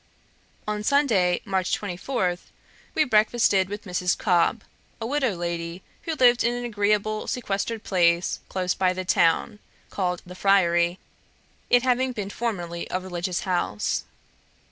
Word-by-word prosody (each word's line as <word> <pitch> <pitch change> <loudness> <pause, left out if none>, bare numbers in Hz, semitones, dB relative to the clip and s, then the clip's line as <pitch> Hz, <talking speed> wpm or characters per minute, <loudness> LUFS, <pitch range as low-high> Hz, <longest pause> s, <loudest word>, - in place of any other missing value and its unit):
On 210 0 -2
Sunday, 210 -10 +2
March 190 -2 0
24, 185 -1 -2 0.6
we 310 - +4
breakfasted 215 -5 +3
with 205 +1 -6
Mrs. 180 -2 0
Cobb, 185 +4 +2 0.4
a 225 - -4
widow 260 -4 0
lady, 170 +1 -4 0.2
who 325 - -2
lived 245 -3 +5
in 240 +1 +1
an 245 0 -4
agreeable 210 -1 0
sequestered 225 -1 -2
place 170 -2 +2
close 185 -1 -1
by 185 -1 +1
the 185 0 -5
town, 175 +5 +2 0.3
called 180 -2 -2
the 180 - -10
Friary, 175 -2 +3 0.7
it 245 0 +5
having 255 0 +1
been 205 -4 -5
formerly 175 -8 -3
a 185 - -1
religious 180 -1 -3
house. 175 - -1
195 Hz, 135 wpm, -25 LUFS, 180-230 Hz, 0.7 s, lived